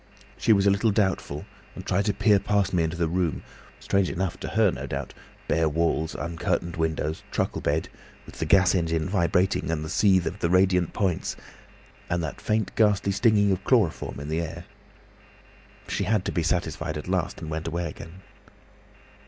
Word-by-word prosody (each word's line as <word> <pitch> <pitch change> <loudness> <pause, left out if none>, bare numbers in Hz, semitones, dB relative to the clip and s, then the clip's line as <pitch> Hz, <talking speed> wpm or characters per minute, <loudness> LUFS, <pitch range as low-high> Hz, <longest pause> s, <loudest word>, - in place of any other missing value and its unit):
She - - +1
was 100 -2 +4
a 100 - +5
little 100 +3 +2
doubtful 95 -8 -1 0.3
and - - -8
tried 100 +3 +1
to 105 - +1
peer 105 0 +4
past 100 -1 0
me 90 - +3
into 80 +1 -1
the 85 -1 +1
room; 85 -5 -1 0.4
strange 100 -2 +1
enough 95 -1 -2
to - - -5
her 105 -2 +3
no - - -6
doubt—bare 80 0 -3
walls, 80 0 0
uncurtained 85 0 -2
windows, 80 -1 -1
truckle - - -2
bed, 75 +3 0 0.4
with - - -13
the - - -1
gas 95 -2 +5
engine 80 -3 0
vibrating, 90 -1 +1
and 80 -2 -1
the - - -6
seethe 95 -4 +3
of 85 +5 -4
the 85 - 0
radiant 90 -1 +3
points, 95 -5 -1 0.7
and 85 -1 0
that 80 - -5
faint 110 -2 0
ghastly 100 -3 +3
stinging 105 -1 +3
of 95 - -1
chloroform 110 - +1
in 70 - -6
the 80 +2 -1
air. 85 +1 -6 1.2
She 100 - -1
had 105 0 +1
to - - -1
be 85 - 0
satisfied 80 -2 -1
at 75 - -7
last 90 -1 -1
and 80 -2 -6
went 80 +2 -3
away 85 +1 -2
again." 80 +4 -10
90 Hz, 180 wpm, -26 LUFS, 80-100 Hz, 1.2 s, a